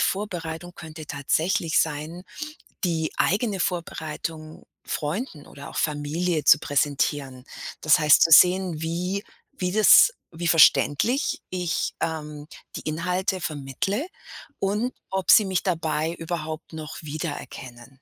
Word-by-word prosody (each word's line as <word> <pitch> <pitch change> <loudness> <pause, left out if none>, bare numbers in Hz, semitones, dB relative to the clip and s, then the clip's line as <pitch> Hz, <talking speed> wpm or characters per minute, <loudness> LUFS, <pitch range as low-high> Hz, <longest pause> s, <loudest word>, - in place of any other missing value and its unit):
Vorbereitung 175 -4 -3
könnte 160 -2 -10
tatsächlich 160 +3 +1
sein, 160 +3 -3 0.6
die 165 -3 0
eigene 200 0 +1
Vorbereitung 160 -2 -4 0.2
Freunden 155 - -4
oder 140 0 -11
auch - - -8
Familie 155 +2 -1
zu 150 - +7
präsentieren. 140 -3 -1 0.4
Das 155 0 +5
heißt, 150 -1 +6
zu 165 - +2
sehen, 180 -1 +6
wie 180 +5 -2 0.4
wie 180 -1 -1
das 215 - +7 0.2
wie 170 +1 -4
verständlich 170 - +3
ich, 180 -2 -2
ähm, 150 -2 -4 0.3
die - - -5
Inhalte 180 +4 -2
vermittle 155 - -3 0.5
und 210 +6 -1 0.2
ob 190 -2 +1
sie 215 - +7
mich 190 -2 -1
dabei 160 -3 -1
überhaupt 160 -1 -6
noch 155 -1 -7
wiedererkennen. 135 -5 -7
160 Hz, 115 wpm, -24 LUFS, 150-180 Hz, 0.6 s, zu